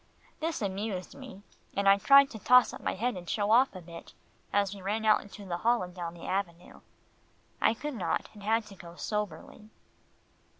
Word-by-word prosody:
This 320 -7 -2
amused 195 -1 -4
me, 255 -7 -11 0.3
and 200 0 0
I 195 0 +6
tried 275 +6 +6
to 220 - -8
toss 250 +4 +5
up - - -9
my - - -2
head 235 +4 -1
and 175 -1 -8
show 205 0 0
off 250 0 +4
a 185 - -7
bit, 170 0 -12 0.4
as 200 -1 +1
we 200 - -10
ran 210 +4 -2
out 215 -1 +5
into 205 0 -12
the 175 -2 -3
hall 235 +3 +2
and 180 0 -8
down 175 -2 -6
the 170 - -11
avenue. 180 -3 -4 0.8
I 225 - +3
could 295 +5 -5
not, 215 -7 -2
and 210 - -13
had 220 +2 +1
to 205 -2 -13
go 170 -2 -12
soberly. 210 +1 -5
205 Hz, 200 wpm, -29 LUFS, 185-225 Hz, 0.8 s, I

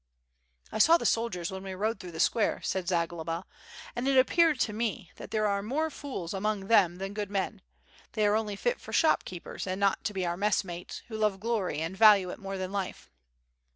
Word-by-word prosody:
"1 220 - +1
saw 330 +7 +7
the - - -5
soldiers 205 -7 0
when 190 0 -6
we 190 -1 -6
rode 215 +4 -1
through 180 -3 -8
the 160 - -8
square," 220 +5 +2
said 185 -2 -2
Zagloba, 170 -1 -1 0.5
"and 240 +2 -2
it 270 -1 +3
appeared 310 +2 +4
to 210 - +1
me 215 -4 -3
that - - -9
there 215 -1 0
are 200 -1 +1
more 300 +9 -1
fools 255 - -6
among 200 0 -1
them 190 -6 +5
than 195 +2 -5
good 205 -1 -3
men, 200 0 -2 0.5
they 215 - +1
are 205 - +4
only 215 -2 -1
fit 485 - -1
for - - -9
shop 320 - +4
keepers 180 +1 -7
and 185 +1 -2
not 200 -1 +2
to 210 - -1
be 185 -1 -1
our 170 0 -2
messmates, 190 -3 -2
who 220 - -6
love 210 -3 +1
glory, 210 -7 -1
and 165 +4 -3
value 200 -3 +6
it - - -8
more 195 0 -5
than 185 0 -4
life." 190 - -4
200 Hz, 215 wpm, -29 LUFS, 185-220 Hz, 0.5 s, saw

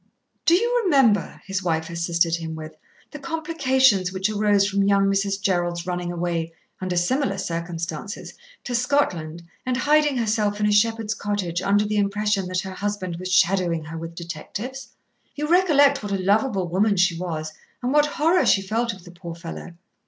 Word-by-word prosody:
"Do 335 - +7
you 480 +5 +2
remember," 270 - +2
his 195 -1 -2
wife 160 -3 -1
assisted 170 0 +1
him 160 -1 -6
with, 155 0 -8 0.4
"the 295 - -8
complications 265 - +2
which 190 +2 -1
arose 205 -1 +3
from 200 0 0
young 195 0 +3
Mrs. 195 0 0
Jerrold's 175 -3 -1
running 180 -1 -3
away, 170 -1 -2 0.3
under 185 -2 -2
similar 200 +3 +1
circumstances, 170 +2 -5 0.3
to 245 - -5
Scotland 180 - 0 0.2
and 250 -1 -1
hiding 295 0 +3
herself 210 -3 0
in 210 - +1
a 210 - +3
shepherd's 225 +1 +2
cottage 200 -5 -2
under 205 +2 +2
the 210 0 -1
impression 205 -1 0
that 180 0 -1
her 190 - -7
husband 190 -3 -3
was 185 +1 -5
shadowing 175 -3 +2
her 160 +2 -7
with 165 0 -7
detectives? 200 - -6 0.5
You 300 +1 -2
recollect 295 -5 +4
what 205 -1 -5
a 195 - +1
lovable 195 0 +1
woman 200 +4 +1
she 180 -1 +3
was, 160 -3 -4 0.3
and 250 +2 0
what 295 0 +4
horror 325 +4 +2
she 195 - +4
felt 225 +4 -1
of 190 -2 -13
the 175 - -12
poor 170 -1 -8
fellow." 170 0 -8
195 Hz, 175 wpm, -23 LUFS, 175-235 Hz, 0.5 s, Do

